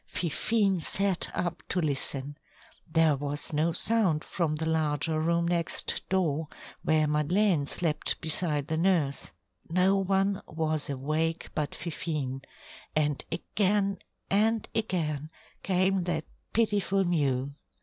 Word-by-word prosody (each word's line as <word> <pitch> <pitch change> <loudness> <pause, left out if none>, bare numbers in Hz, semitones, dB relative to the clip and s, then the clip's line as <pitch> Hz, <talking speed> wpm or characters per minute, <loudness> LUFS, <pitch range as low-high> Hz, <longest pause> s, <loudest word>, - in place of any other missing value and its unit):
Fifine 195 +3 +1
sat 195 +1 +1
up 175 -1 -2
to 180 - +1
listen. 140 -2 -2 0.6
There 160 -2 +4
was 145 +2 -2
no 155 +3 +2
sound 185 -4 +2
from 165 -4 -1
the 160 +1 -3
larger 160 0 +1
room 170 +1 +1
next 170 -1 +1
door, 160 -5 +1 0.3
where 155 -1 +3
Madeleine 150 +2 +2
slept 155 -2 -1
beside 155 -2 -1
the 160 - -1
nurse. 165 -6 +1 0.4
No 185 +3 +3
one 195 0 +1
was 155 -2 -2
awake 155 +4 -1
but 150 -2 -2
Fifine, 150 -6 -3 0.5
and 150 -2 +1
again, 195 +3 0 0.3
and 220 +2 +2
again 155 -9 -1 0.3
came 190 0 +2
that 160 -3 -1 0.3
pitiful 205 -3 +2
mew. 140 -6 0
165 Hz, 120 wpm, -29 LUFS, 150-190 Hz, 0.6 s, There